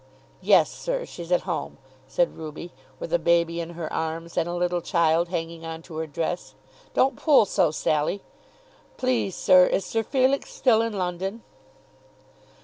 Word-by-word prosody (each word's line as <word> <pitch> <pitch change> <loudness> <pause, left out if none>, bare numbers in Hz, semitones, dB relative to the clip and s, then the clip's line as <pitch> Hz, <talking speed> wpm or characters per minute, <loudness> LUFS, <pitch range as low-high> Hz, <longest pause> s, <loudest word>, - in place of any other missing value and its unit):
"Yes, - - +4
sir; - - -3
she's 170 0 -9
at 180 - +4
home," 175 -4 -4 0.3
said 170 +6 0
Ruby, 160 +2 -8 0.3
with 170 - -6
a 170 - +4
baby 170 0 +2
in 170 +1 -7
her 165 -2 -5
arms 165 +1 -3
and 170 - 0
a 175 - -3
little 175 0 0
child 170 -1 +2
hanging 165 -1 -4
on 165 0 -7
to 165 -2 -9
her 160 0 -3
dress. 165 +3 -4 0.4
"Don't 270 +1 +3
pull 290 -8 +5
so, 185 -3 +2
Sally. 155 +5 -1 0.7
Please, 255 -7 0
sir, 185 -1 +6
is 195 - 0
Sir 225 - -1
Felix 265 +4 +1
still 225 -4 +3
in 230 -1 -2
London?" 190 +3 -3
175 Hz, 160 wpm, -25 LUFS, 165-200 Hz, 0.7 s, sir